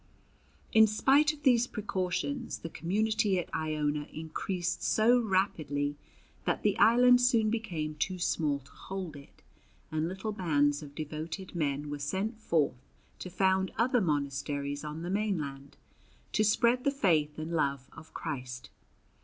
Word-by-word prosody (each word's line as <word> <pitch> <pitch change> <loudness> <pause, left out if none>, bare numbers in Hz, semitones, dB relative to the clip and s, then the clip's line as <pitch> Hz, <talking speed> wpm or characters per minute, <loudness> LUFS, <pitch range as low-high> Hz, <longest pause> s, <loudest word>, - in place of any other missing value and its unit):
In 220 0 +7
spite 275 +8 +4
of 300 -1 -13
these 245 -3 +4
precautions 185 -10 -3
the 165 - -8
community 205 +3 +1
at 175 - -4
Iona 150 -1 -1
increased 175 +3 -3
so 235 +3 +4
rapidly 155 -8 0 0.5
that - - 0
the - - +3
island 245 +2 +6
soon 230 -4 +3
became 170 -10 -3
too 185 +5 -2
small 155 -4 0
to 135 - -20
hold 185 -5 -6
it, 140 -1 -15 0.5
and 155 +1 0
little 190 +4 -4
bands 145 -7 +1
of 145 -2 -11
devoted 155 +4 -5
men 145 -3 -2
were 145 - -4
sent 195 +10 -2
forth 150 - 0 0.4
to 185 - -6
found 190 +1 +1
other 245 +1 +3
monasteries 145 -2 -2
on 150 +2 -6
the 175 - -3
mainland, 150 -10 -2 0.5
to 215 - +2
spread 235 +4 +3
the - - +3
faith 165 - +1
and 155 +2 -5
love 140 -5 0
of 160 0 -13
Christ. 130 -5 -6
170 Hz, 145 wpm, -30 LUFS, 150-215 Hz, 0.5 s, In